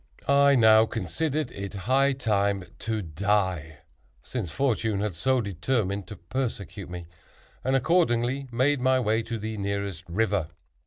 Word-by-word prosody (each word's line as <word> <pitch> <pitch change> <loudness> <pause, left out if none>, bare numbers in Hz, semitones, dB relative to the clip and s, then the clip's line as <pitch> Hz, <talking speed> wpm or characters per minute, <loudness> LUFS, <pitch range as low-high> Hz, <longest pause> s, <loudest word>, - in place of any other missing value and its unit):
I 140 0 +5
now 110 -2 +6
considered 150 +4 -2
it 100 +1 -6
high 135 +3 +3
time 100 -6 0 0.2
to 110 -2 -2
die, 90 -2 -1 0.4
(since 115 -9 -4
fortune 110 - 0
had 105 -1 -1
so 130 +9 +1
determined 100 -1 -1
to 105 - -8
persecute 100 -2 -4
me,) 90 -1 -7 0.6
and 130 +1 +1
accordingly 135 -3 +2
made 130 +3 +2
my 130 0 +3
way 110 -1 +1
to 115 +1 -4
the 110 0 -5
nearest 100 -3 -3
river. 100 -2 0
110 Hz, 140 wpm, -26 LUFS, 100-130 Hz, 0.6 s, now